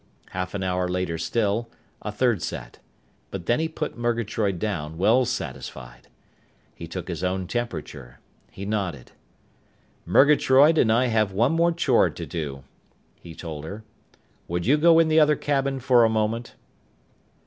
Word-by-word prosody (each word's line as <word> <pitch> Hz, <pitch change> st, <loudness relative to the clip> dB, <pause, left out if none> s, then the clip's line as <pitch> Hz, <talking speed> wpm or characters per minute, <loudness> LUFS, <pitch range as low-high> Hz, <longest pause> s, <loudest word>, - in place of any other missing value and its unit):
Half 90 Hz, +1 st, -4 dB
an 95 Hz, -, -2 dB
hour 90 Hz, -1 st, 0 dB
later 90 Hz, -2 st, -2 dB
still, 110 Hz, +5 st, -1 dB, 0.3 s
a 105 Hz, -, -4 dB
third 115 Hz, -3 st, +1 dB
set. -, -, -6 dB, 0.5 s
But 95 Hz, -3 st, -7 dB
then 120 Hz, -, +2 dB
he 160 Hz, -, 0 dB
put 155 Hz, -5 st, -5 dB
Murgatroyd 115 Hz, -4 st, -1 dB
down, 80 Hz, -6 st, -4 dB
well 115 Hz, +8 st, +3 dB
satisfied. 70 Hz, -, -6 dB, 0.7 s
He -, -, -9 dB
took -, -, -6 dB
his -, -, -5 dB
own 95 Hz, 0 st, -1 dB
temperature. 75 Hz, -, -5 dB, 0.3 s
He 100 Hz, -, -8 dB
nodded. 95 Hz, -, -3 dB, 1.0 s
"Murgatroyd 145 Hz, +2 st, +5 dB
and 110 Hz, -, +4 dB
I 120 Hz, +3 st, +3 dB
have 110 Hz, -5 st, +1 dB
one 115 Hz, +9 st, +2 dB
more 170 Hz, +1 st, +3 dB
chore 170 Hz, -, +3 dB
to -, -, -7 dB
do," 70 Hz, -5 st, -5 dB, 0.6 s
he 85 Hz, -2 st, -11 dB
told 80 Hz, -4 st, -7 dB
her. 100 Hz, +7 st, -8 dB, 0.6 s
"Would 85 Hz, 0 st, -2 dB
you 135 Hz, -, +5 dB
go 165 Hz, +2 st, +5 dB
in 165 Hz, -1 st, +5 dB
the 160 Hz, 0 st, +4 dB
other 150 Hz, -1 st, +5 dB
cabin 140 Hz, -2 st, -1 dB
for 125 Hz, -2 st, +4 dB
a 115 Hz, -, +4 dB
moment?" 110 Hz, +2 st, -2 dB
110 Hz, 155 wpm, -24 LUFS, 90-130 Hz, 1.0 s, Murgatroyd